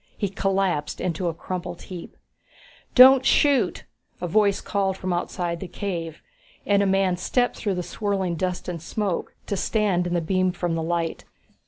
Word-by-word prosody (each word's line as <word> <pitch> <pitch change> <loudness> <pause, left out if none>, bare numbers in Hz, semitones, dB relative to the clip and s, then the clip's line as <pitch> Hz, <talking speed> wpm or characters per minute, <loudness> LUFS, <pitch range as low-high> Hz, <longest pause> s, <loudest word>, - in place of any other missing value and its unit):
He 200 - -1
collapsed 190 -5 -1
into 180 0 -2
a 170 - -1
crumpled 175 0 -6
heap. 180 -3 -9 0.8
"Don't 260 +1 +9
shoot," 270 -6 +3 0.4
a 180 - -3
voice 200 +2 +3
called 195 -2 -1
from 185 -1 -2
outside 175 -1 -2
the 190 - -6
cave, 170 -4 -5 0.4
and 200 -1 +3
a 200 - +2
man 190 -2 +2
stepped 245 +7 0
through 200 -4 -1
the 180 - -2
swirling 195 -3 -2
dust 180 +2 -3
and 170 -3 -4
smoke 200 0 -3
to 200 - -2
stand 195 -3 +1
in 175 - -1
the - - +2
beam 185 +2 +1
from 175 -2 -2
the 165 - -1
light. 165 0 -2
185 Hz, 170 wpm, -24 LUFS, 175-200 Hz, 0.8 s, Don't